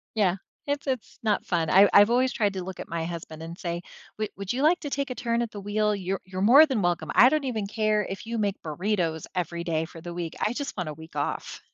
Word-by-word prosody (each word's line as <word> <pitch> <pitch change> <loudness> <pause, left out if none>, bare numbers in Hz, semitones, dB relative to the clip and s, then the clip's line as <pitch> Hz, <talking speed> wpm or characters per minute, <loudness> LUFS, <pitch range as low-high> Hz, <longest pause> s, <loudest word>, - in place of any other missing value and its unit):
Yeah, 190 -4 +2 0.3
it's 285 0 -2
it's 255 -4 -3
not 215 -2 +1
fun, 165 -4 0
I 200 +2 +7
I've 205 +2 +7
always 255 +2 +3
tried 205 -3 0
to 185 -1 -4
look 190 -1 -7
at - - -7
my 165 -1 -2
husband 160 -2 -6
and 170 +1 -7
say, 170 -2 -3 0.4
"W 215 -1 -1
would 195 -1 -3
you 260 +3 -2
like 335 +4 +4
to 290 - -5
take 280 -1 -2
a 255 - -2
turn 235 -1 -1
at 235 - -2
the 205 - -6
wheel? 210 +1 +1
You're 190 -1 -3
you're 185 0 -5
more 275 +9 +8
than 255 -9 -1
welcome. 170 -3 0
I 250 - +8
don't 305 0 +1
even 225 -6 -2
care 215 -1 +1
if 195 +3 -7
you 235 - -3
make 205 -2 -1
burritos 165 -1 -1
every 170 -1 -2
day 160 -1 0
for 165 0 -11
the 175 +1 -7
week, 170 -2 -4
I 215 - +1
just 280 -1 -5
want 180 -4 -3
a 155 - -5
week 160 +2 -13
off." - - -3
200 Hz, 260 wpm, -26 LUFS, 170-230 Hz, 0.4 s, more